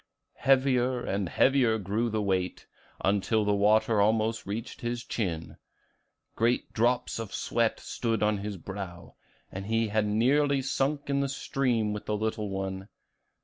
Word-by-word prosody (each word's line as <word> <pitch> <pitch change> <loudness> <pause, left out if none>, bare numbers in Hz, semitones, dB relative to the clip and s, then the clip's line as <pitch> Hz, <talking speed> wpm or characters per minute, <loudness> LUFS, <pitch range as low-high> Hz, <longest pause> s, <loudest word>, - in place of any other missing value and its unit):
Heavier 130 -2 +2
and 100 -2 -1
heavier 125 - +3
grew 110 +4 -1
the 110 -1 -1
weight, 95 -2 -1 0.4
until 105 +2 +2
the 105 - +2
water 105 +1 +3
almost 110 +1 +1
reached 110 +4 -5
his 120 0 -3
chin; 85 -10 -3 0.8
great 120 +2 +1
drops 120 +1 +1
of 110 -3 -5
sweat 115 -1 0
stood 115 -3 -2
on 105 -1 +2
his 100 0 -5
brow, 95 -1 -8 0.4
and 95 +1 -6
he 115 0 +1
had 105 0 +1
nearly 135 +7 +3
sunk 140 +2 -1
in 140 - +2
the 140 0 0
stream 125 -5 0
with 105 - -6
the 105 - 0
little 110 -1 -2
one. 95 0 -4
110 Hz, 145 wpm, -28 LUFS, 100-120 Hz, 0.8 s, heavier